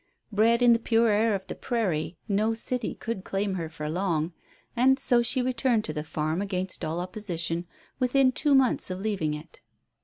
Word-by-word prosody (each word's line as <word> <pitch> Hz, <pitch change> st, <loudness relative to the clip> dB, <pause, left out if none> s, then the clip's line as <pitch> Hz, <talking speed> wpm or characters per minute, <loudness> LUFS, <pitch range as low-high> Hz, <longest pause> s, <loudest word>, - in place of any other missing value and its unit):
Bred 230 Hz, +3 st, +3 dB
in 240 Hz, -1 st, +7 dB
the 230 Hz, -, +2 dB
pure 230 Hz, 0 st, +3 dB
air 215 Hz, +1 st, +3 dB
of 190 Hz, -1 st, -5 dB
the -, -, -5 dB
prairie, 175 Hz, -9 st, -2 dB
no 215 Hz, +2 st, +1 dB
city 250 Hz, +2 st, -2 dB
could 225 Hz, -5 st, -5 dB
claim 195 Hz, 0 st, -1 dB
her 165 Hz, -4 st, -3 dB
for 150 Hz, -1 st, -6 dB
long. 165 Hz, -1 st, -1 dB, 0.4 s
And 260 Hz, +2 st, +4 dB
so 240 Hz, -3 st, +3 dB
she 250 Hz, +2 st, 0 dB
returned 245 Hz, -2 st, +1 dB
to 155 Hz, -, -4 dB
the 150 Hz, -1 st, -3 dB
farm 155 Hz, +2 st, -2 dB
against 190 Hz, -2 st, -3 dB
all 160 Hz, +2 st, -2 dB
opposition 175 Hz, -3 st, -2 dB, 0.3 s
within 255 Hz, +1 st, +3 dB
two 285 Hz, +2 st, +2 dB
months 265 Hz, -7 st, +3 dB
of 185 Hz, 0 st, -4 dB
leaving 190 Hz, -8 st, -1 dB
it. 150 Hz, +2 st, -11 dB
205 Hz, 185 wpm, -27 LUFS, 170-235 Hz, 0.4 s, in